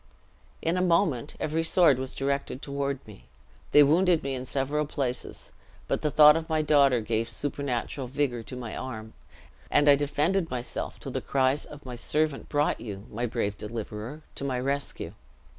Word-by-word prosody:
"In 165 Hz, +2 st, +1 dB
a -, -, +1 dB
moment 170 Hz, -, +1 dB
every 155 Hz, +1 st, 0 dB
sword 165 Hz, -5 st, +4 dB
was 130 Hz, 0 st, -5 dB
directed 140 Hz, -1 st, -2 dB
toward 140 Hz, -1 st, -3 dB
me. -, -, -14 dB, 0.4 s
They 150 Hz, -, +8 dB
wounded 170 Hz, +3 st, +3 dB
me 135 Hz, 0 st, -2 dB
in 130 Hz, 0 st, -5 dB
several 145 Hz, +3 st, -1 dB
places; 130 Hz, -4 st, -4 dB, 0.4 s
but -, -, 0 dB
the 150 Hz, -, +1 dB
thought 150 Hz, 0 st, +8 dB
of 165 Hz, 0 st, -3 dB
my 155 Hz, -1 st, +1 dB
daughter 140 Hz, -5 st, +4 dB
gave 115 Hz, +1 st, -1 dB
supernatural 140 Hz, -2 st, -3 dB
vigor 130 Hz, -2 st, -1 dB
to 115 Hz, +3 st, -9 dB
my 120 Hz, -3 st, -6 dB
arm, 110 Hz, -4 st, -6 dB, 0.6 s
and 145 Hz, 0 st, +3 dB
I 145 Hz, -, +9 dB
defended 150 Hz, +5 st, 0 dB
myself 125 Hz, -1 st, -4 dB
till -, -, -6 dB
the -, -, -2 dB
cries 135 Hz, +1 st, +1 dB
of 145 Hz, -1 st, -12 dB
my 125 Hz, -, -6 dB
servant 150 Hz, +4 st, -1 dB
brought 145 Hz, 0 st, +1 dB
you, 100 Hz, -3 st, -7 dB
my 120 Hz, +3 st, -2 dB
brave 100 Hz, -2 st, -2 dB
deliverer, 110 Hz, +6 st, -6 dB
to -, -, -6 dB
my 130 Hz, -2 st, -1 dB
rescue. 140 Hz, +2 st, -2 dB
140 Hz, 175 wpm, -27 LUFS, 125-150 Hz, 0.6 s, I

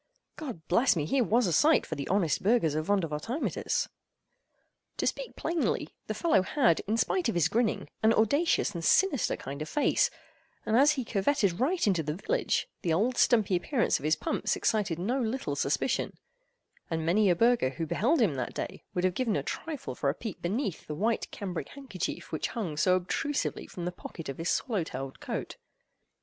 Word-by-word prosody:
God 245 Hz, -, -7 dB
bless 230 Hz, +8 st, +4 dB
me!—here 165 Hz, -, +1 dB
was 235 Hz, +2 st, +2 dB
a 175 Hz, -, 0 dB
sight 300 Hz, -, +4 dB
for -, -, -5 dB
the 140 Hz, -3 st, -4 dB
honest 185 Hz, -6 st, +1 dB
burghers 195 Hz, -7 st, +3 dB
of 155 Hz, +1 st, -2 dB
Vondervotteimittiss! 200 Hz, -, -1 dB, 1.1 s
To -, -, -1 dB
speak -, -, -2 dB
plainly, 330 Hz, 0 st, -1 dB, 0.2 s
the -, -, -3 dB
fellow 325 Hz, -, +3 dB
had, 185 Hz, -, +2 dB
in 220 Hz, +2 st, +1 dB
spite 340 Hz, +4 st, +1 dB
of 225 Hz, -, -2 dB
his 170 Hz, -4 st, +3 dB
grinning, 230 Hz, -1 st, 0 dB
an 220 Hz, -, +5 dB
audacious 255 Hz, +6 st, +2 dB
and 170 Hz, -2 st, -5 dB
sinister 310 Hz, -, +3 dB
kind 140 Hz, +2 st, -7 dB
of 155 Hz, -, -4 dB
face; 295 Hz, -, +2 dB, 0.6 s
and 220 Hz, -, +1 dB
as 285 Hz, +5 st, +6 dB
he 260 Hz, -5 st, -3 dB
curvetted 200 Hz, -3 st, +1 dB
right 335 Hz, +8 st, +1 dB
into 190 Hz, -6 st, +2 dB
the 150 Hz, 0 st, -3 dB
village, 475 Hz, -, 0 dB
the 170 Hz, -, 0 dB
old 220 Hz, +10 st, +2 dB
stumpy 215 Hz, -7 st, +3 dB
appearance 235 Hz, +8 st, +1 dB
of -, -, -12 dB
his 155 Hz, +1 st, +3 dB
pumps -, -, -1 dB
excited 205 Hz, -7 st, 0 dB
no 235 Hz, +10 st, -1 dB
little 250 Hz, +4 st, -2 dB
suspicion; -, -, -1 dB, 0.7 s
and 160 Hz, -2 st, -2 dB
many 195 Hz, +4 st, +3 dB
a 175 Hz, -, +4 dB
burgher 235 Hz, -, +3 dB
who 135 Hz, +5 st, -4 dB
beheld 245 Hz, -, +1 dB
him 200 Hz, -10 st, +3 dB
that 130 Hz, -2 st, -4 dB
day -, -, -5 dB
would 180 Hz, -, 0 dB
have 185 Hz, -1 st, +2 dB
given 230 Hz, -1 st, 0 dB
a -, -, -1 dB
trifle 295 Hz, -, -5 dB
for 140 Hz, -, -1 dB
a 140 Hz, -, -1 dB
peep 220 Hz, -2 st, -7 dB
beneath 195 Hz, -, -2 dB
the 150 Hz, -, -4 dB
white 220 Hz, +8 st, 0 dB
cambric 185 Hz, -5 st, -5 dB
handkerchief 260 Hz, -, -5 dB
which 155 Hz, -, -1 dB
hung 190 Hz, -10 st, -4 dB
so 175 Hz, +5 st, +3 dB
obtrusively 190 Hz, +10 st, -2 dB
from 175 Hz, -, -6 dB
the 180 Hz, -, -1 dB
pocket 165 Hz, -3 st, -9 dB
of 135 Hz, -, -6 dB
his 165 Hz, -, -1 dB
swallow 220 Hz, -9 st, 0 dB
tailed 135 Hz, -3 st, -6 dB
coat. -, -, -5 dB
200 Hz, 190 wpm, -29 LUFS, 165-250 Hz, 1.1 s, as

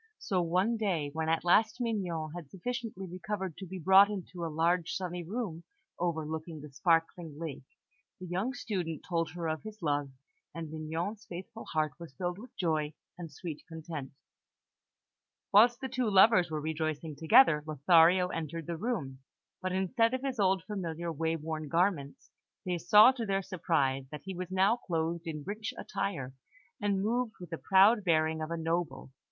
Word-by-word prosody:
So, 185 Hz, -2 st, 0 dB
one 185 Hz, +7 st, +1 dB
day, 175 Hz, -9 st, -1 dB
when 160 Hz, 0 st, -1 dB
at 165 Hz, 0 st, +1 dB
last 220 Hz, +7 st, +4 dB
Mignon 180 Hz, -10 st, -2 dB
had 170 Hz, -5 st, -8 dB
sufficiently 225 Hz, -, -5 dB
recovered 185 Hz, 0 st, -4 dB
to 190 Hz, -, -7 dB
be 190 Hz, +2 st, -6 dB
brought 190 Hz, +4 st, +7 dB
into 185 Hz, -3 st, -6 dB
a -, -, -1 dB
large, 165 Hz, +2 st, +1 dB
sunny 180 Hz, -2 st, -3 dB
room 180 Hz, -3 st, -4 dB, 0.4 s
overlooking 160 Hz, -1 st, -3 dB
the 150 Hz, 0 st, -10 dB
sparkling 165 Hz, +1 st, 0 dB
lake, 160 Hz, -4 st, -5 dB, 0.6 s
the 185 Hz, -, -7 dB
young 190 Hz, +9 st, -2 dB
student 180 Hz, -, -3 dB
told 165 Hz, -2 st, -1 dB
her 170 Hz, -2 st, -3 dB
of 155 Hz, 0 st, -2 dB
his 215 Hz, 0 st, -9 dB
love, 145 Hz, -2 st, 0 dB, 0.5 s
and 165 Hz, -2 st, -6 dB
Mignon's 165 Hz, +7 st, -4 dB
faithful 190 Hz, +6 st, -8 dB
heart 155 Hz, -2 st, 0 dB
was 165 Hz, -6 st, -10 dB
filled 180 Hz, +2 st, -3 dB
with 245 Hz, +4 st, -13 dB
joy 155 Hz, -4 st, 0 dB, 0.2 s
and 170 Hz, -2 st, -8 dB
sweet 165 Hz, -5 st, -7 dB
content. 160 Hz, -4 st, -7 dB, 1.4 s
Whilst 235 Hz, +4 st, +6 dB
the 265 Hz, -, -2 dB
two 255 Hz, -3 st, -1 dB
lovers 190 Hz, -2 st, +6 dB
were 155 Hz, -1 st, -2 dB
rejoicing 155 Hz, 0 st, -3 dB
together, 165 Hz, -, +6 dB
Lothario 165 Hz, +4 st, +5 dB
entered 165 Hz, -1 st, -4 dB
the 170 Hz, +1 st, -4 dB
room; 160 Hz, -, -3 dB, 0.4 s
but 185 Hz, 0 st, -2 dB
instead 230 Hz, +6 st, +2 dB
of 260 Hz, -, -5 dB
his 265 Hz, -4 st, -3 dB
old 190 Hz, -2 st, +3 dB
familiar, 170 Hz, -4 st, -4 dB
way 160 Hz, +1 st, -1 dB
worn 155 Hz, -1 st, -4 dB
garments, 165 Hz, -3 st, 0 dB, 0.3 s
they 180 Hz, -1 st, -1 dB
saw, 210 Hz, +8 st, +8 dB
to 255 Hz, -3 st, -5 dB
their 195 Hz, 0 st, 0 dB
surprise, 140 Hz, -8 st, 0 dB
that 150 Hz, -1 st, -8 dB
he 190 Hz, -, -5 dB
was 180 Hz, 0 st, -5 dB
now 190 Hz, +5 st, +3 dB
clothed 170 Hz, -3 st, -2 dB
in 155 Hz, -2 st, -4 dB
rich 210 Hz, +3 st, -4 dB
attire, 165 Hz, -11 st, -3 dB, 0.5 s
and 200 Hz, -2 st, +1 dB
moved 235 Hz, +1 st, 0 dB
with 175 Hz, -2 st, -10 dB
the 165 Hz, -, -3 dB
proud 200 Hz, +3 st, +5 dB
bearing 160 Hz, -2 st, +2 dB
of 155 Hz, -, -3 dB
a 170 Hz, -, -2 dB
noble. 165 Hz, -5 st, -2 dB
175 Hz, 170 wpm, -31 LUFS, 160-195 Hz, 1.4 s, saw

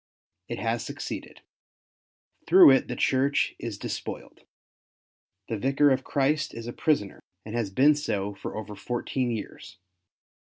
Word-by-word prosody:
It -, -, -4 dB
has 115 Hz, +1 st, -1 dB
succeeded. -, -, -7 dB, 1.1 s
Through 180 Hz, -4 st, +9 dB
it 135 Hz, -, +3 dB
the 125 Hz, -, -4 dB
Church 135 Hz, +3 st, +1 dB
is -, -, -5 dB
despoiled. -, -, -6 dB, 1.1 s
The 110 Hz, -, -3 dB
Vicar 140 Hz, +4 st, +3 dB
of 130 Hz, 0 st, +1 dB
Christ 150 Hz, +2 st, 0 dB
is 115 Hz, -, -7 dB
a 120 Hz, -, -5 dB
prisoner, 140 Hz, -11 st, 0 dB, 0.3 s
and 105 Hz, -, -7 dB
has 115 Hz, -4 st, -1 dB
been 135 Hz, +10 st, +5 dB
so 105 Hz, -9 st, -2 dB
for 100 Hz, -, -7 dB
over 105 Hz, -1 st, -6 dB
fourteen 120 Hz, +4 st, -2 dB
years. 110 Hz, -7 st, -6 dB
125 Hz, 135 wpm, -27 LUFS, 110-140 Hz, 1.1 s, Through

